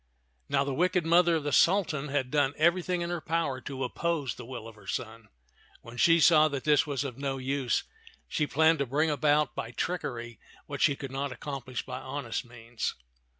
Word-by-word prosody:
Now 135 - +2
the 140 -1 -3
wicked 180 +3 +1
mother 170 +1 +5
of 160 - -1
the 145 - -2
Sultan 160 -2 +3
had 135 -3 -1
done 145 -1 +2
everything 175 +2 +2
in 170 0 -2
her 175 -2 -3
power 155 -5 -1
to 135 0 -5
oppose 145 0 -1
the 125 - -10
will 120 -3 -7
of 115 - -10
her 105 - -18
son. 115 -2 -5 0.6
When 115 - -11
she 165 +7 +5
saw 155 -1 +6
that 140 -3 -4
this 150 0 +3
was 145 -1 -1
of 135 -2 -6
no 135 -1 -2
use, 130 -1 -1 0.4
she 150 -3 -1
planned 160 +1 +3
to 140 - 0
bring 150 +5 +1
about 150 0 +2
by 115 - -5
trickery 120 -4 -4 0.3
what 145 -1 -6
she 145 -3 +4
could 135 -1 -7
not 140 +1 -2
accom 135 +1 -6
plish 130 -1 -5
by 125 0 -5
honest 130 -2 -4
means. 115 -1 -5
140 Hz, 200 wpm, -29 LUFS, 130-160 Hz, 0.6 s, saw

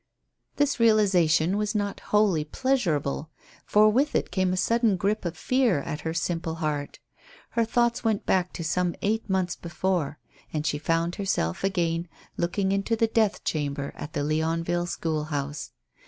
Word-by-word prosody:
This 285 -3 +1
realization 190 -6 +4
was 210 +1 -1
not 205 -1 -1
wholly 205 -7 +3
pleasurable, 160 - -1 0.4
for 210 +1 +5
with 265 +7 +2
it - - 0
came 185 -1 +1
a 185 - -1
sudden 230 0 +2
grip 200 +3 0
of 170 -1 -3
fear 240 - +2
at 150 0 -5
her 160 - -2
simple 165 -1 -2
heart. 150 -3 -3 0.5
Her 230 - +2
thoughts 235 +1 +1
went 220 -3 0
back 180 -1 +1
to 170 - -5
some 175 +2 0
eight 220 +1 0
months 185 -3 0
before. 170 -3 -2 0.3
And 155 -1 -2
she 150 - 0
found 165 +2 0
herself 190 - -1
again 170 -3 0 0.3
looking 190 +3 0
into 200 +3 +1
the 225 - +3
death 220 -2 +1
chamber 140 -2 -2
at 150 - -8
the 145 - -1
Leonville 165 +3 0
school 160 -3 -2
house. 145 -1 -4
180 Hz, 160 wpm, -26 LUFS, 160-210 Hz, 0.5 s, for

